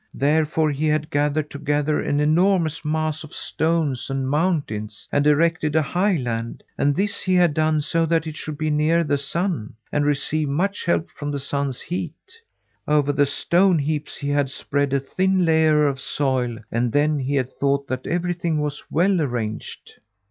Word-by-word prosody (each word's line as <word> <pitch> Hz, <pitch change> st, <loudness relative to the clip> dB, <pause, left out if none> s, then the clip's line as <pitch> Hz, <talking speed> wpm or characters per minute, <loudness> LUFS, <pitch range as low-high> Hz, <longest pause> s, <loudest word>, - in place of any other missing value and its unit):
Therefore 155 Hz, +2 st, +2 dB
he 150 Hz, +2 st, -1 dB
had 155 Hz, +1 st, 0 dB
gathered 150 Hz, +1 st, 0 dB
together 145 Hz, +1 st, 0 dB
an 145 Hz, -, 0 dB
enormous 165 Hz, +1 st, +2 dB
mass 155 Hz, 0 st, -1 dB
of 155 Hz, -, -11 dB
stones 160 Hz, -6 st, -1 dB
and 135 Hz, -1 st, -2 dB
mountains, 140 Hz, -, -1 dB
and 145 Hz, +1 st, +2 dB
erected 155 Hz, 0 st, +2 dB
a 160 Hz, -, +4 dB
highland, 135 Hz, -, -1 dB
and 145 Hz, 0 st, +1 dB
this 200 Hz, +3 st, 0 dB
he 185 Hz, -1 st, +1 dB
had 175 Hz, -4 st, +4 dB
done 155 Hz, 0 st, +2 dB
so 165 Hz, +2 st, 0 dB
that 165 Hz, -1 st, +1 dB
it 155 Hz, -1 st, -6 dB
should 155 Hz, -1 st, -6 dB
be 155 Hz, 0 st, -1 dB
near 155 Hz, +3 st, +2 dB
the 145 Hz, -2 st, 0 dB
sun, 165 Hz, -, -2 dB, 0.2 s
and 145 Hz, -, +1 dB
receive 145 Hz, +1 st, 0 dB
much 190 Hz, +8 st, -1 dB
help 170 Hz, -2 st, +1 dB
from 145 Hz, -1 st, -6 dB
the 145 Hz, -1 st, -2 dB
sun's 140 Hz, -1 st, -2 dB
heat. 175 Hz, -3 st, -4 dB, 0.7 s
Over 145 Hz, -1 st, +2 dB
the 145 Hz, 0 st, +3 dB
stone 175 Hz, +5 st, +2 dB
heaps 150 Hz, 0 st, -2 dB
he 140 Hz, -, -4 dB
had 145 Hz, -1 st, +1 dB
spread 140 Hz, +1 st, -1 dB
a 140 Hz, -, +2 dB
thin 185 Hz, +6 st, +1 dB
layer 155 Hz, -2 st, +4 dB
of 135 Hz, -1 st, -2 dB
soil, 130 Hz, -4 st, -1 dB
and 120 Hz, 0 st, 0 dB
then 150 Hz, +2 st, +2 dB
he 135 Hz, +2 st, -1 dB
had 130 Hz, -2 st, 0 dB
thought 140 Hz, +1 st, -1 dB
that 130 Hz, 0 st, -3 dB
everything 175 Hz, -2 st, -1 dB
was 150 Hz, -1 st, -3 dB
well 180 Hz, +2 st, +2 dB
arranged. 120 Hz, -6 st, -4 dB
150 Hz, 175 wpm, -22 LUFS, 140-160 Hz, 0.7 s, a